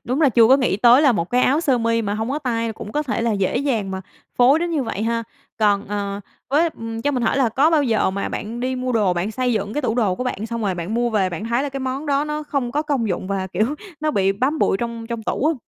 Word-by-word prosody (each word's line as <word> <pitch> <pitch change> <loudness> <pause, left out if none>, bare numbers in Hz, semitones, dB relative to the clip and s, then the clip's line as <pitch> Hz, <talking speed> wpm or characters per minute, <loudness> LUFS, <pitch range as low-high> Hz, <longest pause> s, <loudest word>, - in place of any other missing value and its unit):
đúng 255 +5 -1
là 290 - +5
chưa 230 -1 +5
có 265 - +7
nghĩ 250 -7 +1
tới 245 +6 +6
là 275 -4 +5
một 170 -4 -2
cái 250 +1 +2
áo 285 +5 +3
sơ 265 -7 +2
mi 230 0 +1
mà 205 0 -2
hông 220 +4 -3
có 295 - -1
tay 230 -5 -2
cũng 210 -1 -9
có 300 - 0
thể 245 -4 -2
là 230 -1 +1
dễ 195 +2 0
dàng 240 -8 -1
mà 190 0 -4 0.4
phối 265 +5 +6
đến 345 0 -2
như 305 -4 0
vậy 215 -3 -4
ha. 230 0 0 0.4
Còn, 205 -2 +2
ờ, 200 -1 -3 0.3
với, 310 +5 +3
ừm, 225 0 -5
cho 290 - +1
mình 255 -3 -1
hỏi 230 - +1
là 265 -4 +3
có 280 +8 +3
bao 310 -3 +3
giờ 225 -7 +1
mà 200 +1 -3
bạn 230 +3 -5
đi 255 +1 -1
mua 255 0 -2
đồ 205 -5 +2
bạn 180 +5 -1
xây 250 +1 -1
dựng 205 -1 -2
cái 295 - -1
tủ 230 -3 0
đồ 215 -7 +1
của 250 - -4
bạn 220 -3 -3
xong 230 0 -4
rồi 195 -3 0
bạn 175 +5 -4
mua 240 0 +1
về 195 -4 +1
bạn 175 +6 -5
thấy 235 +3 0
là 285 - -2
cái 275 0 -5
món 265 +3 -3
đó 285 0 +1
nó 300 0 -3
không 275 -5 -2
có 300 - 0
công 275 -8 -1
dụng 185 - -2
và, 195 -1 -2
kiểu, 215 +10 -1 0.3
nó 310 0 +1
bị 195 -6 +2
bám 265 +10 0
bụi - - +2
trong 230 +1 -5
trong 230 -1 -5
tủ 265 - -2
hông? 320 0 +1
235 Hz, 300 wpm, -21 LUFS, 210-275 Hz, 0.4 s, có